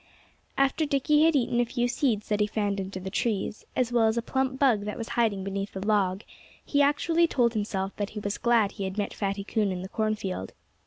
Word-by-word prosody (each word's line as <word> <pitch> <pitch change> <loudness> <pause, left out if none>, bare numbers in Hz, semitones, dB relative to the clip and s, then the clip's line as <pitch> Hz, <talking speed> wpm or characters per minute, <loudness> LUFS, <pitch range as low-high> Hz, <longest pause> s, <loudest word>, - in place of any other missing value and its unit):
After 275 +3 +2
Dickie 295 +2 +3
had 325 -1 +4
eaten 240 -3 +1
a 240 - +3
few 240 +1 -1
seeds 240 -4 0
that 210 -1 +1
he 210 - +3
found 205 -2 -1
under 190 0 -6
the 190 +1 -6
trees, 210 0 -2
as 245 -2 +1
well 235 -2 +4
as 220 +1 0
a 235 - 0
plump 265 +1 -1
bug 240 -7 +3
that 210 - -4
was 230 - -5
hiding 215 -5 +1
beneath 195 +1 -4
a - - -3
log, 200 -1 +1 0.4
he 285 - +2
actually 325 +4 +3
told 240 -6 +2
himself 200 -3 -2
that 205 -1 -2
he 215 - -6
was 205 0 -3
glad 230 -4 +3
he 200 - -5
had 190 +1 -5
met 205 - -2
Fatty 200 -1 -2
Coon 205 0 0
in 180 -1 -4
the 190 - -7
cornfield. 215 - -2
215 Hz, 225 wpm, -27 LUFS, 200-245 Hz, 0.4 s, had